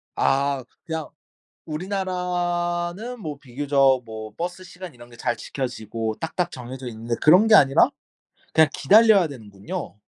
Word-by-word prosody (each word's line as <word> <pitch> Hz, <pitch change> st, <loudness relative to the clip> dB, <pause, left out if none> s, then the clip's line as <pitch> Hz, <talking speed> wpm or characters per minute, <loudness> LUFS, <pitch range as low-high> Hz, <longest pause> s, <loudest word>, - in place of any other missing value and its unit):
아 140 Hz, -1 st, +1 dB, 0.2 s
그냥 160 Hz, -3 st, -4 dB, 0.6 s
우리나라는 180 Hz, +3 st, -2 dB
뭐 150 Hz, -7 st, -6 dB
비교적 135 Hz, 0 st, +2 dB
뭐 110 Hz, -1 st, -8 dB
버스 180 Hz, +2 st, -4 dB
시간 180 Hz, -3 st, -10 dB
이런 120 Hz, 0 st, -15 dB
게 120 Hz, -, -15 dB
잘 120 Hz, -, -1 dB
지켜지고 115 Hz, -4 st, -4 dB
딱딱 170 Hz, +2 st, -2 dB
정해져 125 Hz, 0 st, -8 dB
있는데 115 Hz, +1 st, -4 dB
그런 180 Hz, +8 st, +6 dB
게 215 Hz, -, +7 dB
아니라 135 Hz, -1 st, +5 dB, 0.6 s
그냥 160 Hz, -1 st, +5 dB
기다려야 210 Hz, +2 st, +5 dB
되는군요. 105 Hz, -, -8 dB
145 Hz, 290 characters per minute, -23 LUFS, 120-180 Hz, 0.6 s, 게